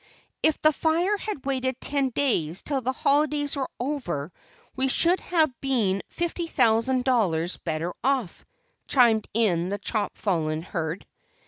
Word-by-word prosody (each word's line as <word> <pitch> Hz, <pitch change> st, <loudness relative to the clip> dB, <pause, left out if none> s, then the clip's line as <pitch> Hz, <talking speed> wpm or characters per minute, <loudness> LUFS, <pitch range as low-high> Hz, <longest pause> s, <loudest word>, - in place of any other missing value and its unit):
"If 315 Hz, -, +2 dB
the 310 Hz, 0 st, +4 dB
fire 335 Hz, +7 st, +1 dB
had 405 Hz, -10 st, -6 dB
waited 260 Hz, -2 st, -1 dB
ten 275 Hz, -2 st, 0 dB
days 195 Hz, -, 0 dB
till 275 Hz, -3 st, -1 dB
the 255 Hz, +1 st, 0 dB
holidays 290 Hz, +2 st, +1 dB
were 270 Hz, -2 st, -2 dB
over, 235 Hz, -, -3 dB, 0.4 s
we 265 Hz, +1 st, +1 dB
should 340 Hz, +7 st, +3 dB
have 320 Hz, -6 st, +1 dB
been 220 Hz, -8 st, +1 dB, 0.2 s
$50,000 260 Hz, -8 st, +1 dB
dollars 185 Hz, -10 st, +1 dB
better 165 Hz, +1 st, -3 dB
off," 260 Hz, -8 st, -1 dB, 0.4 s
chimed 235 Hz, -5 st, +4 dB
in 180 Hz, -6 st, +2 dB
the 200 Hz, -, -2 dB
chop 205 Hz, +1 st, -2 dB
fallen 160 Hz, -5 st, -1 dB
Hurd. 165 Hz, -1 st, -4 dB
255 Hz, 135 wpm, -25 LUFS, 190-285 Hz, 0.4 s, the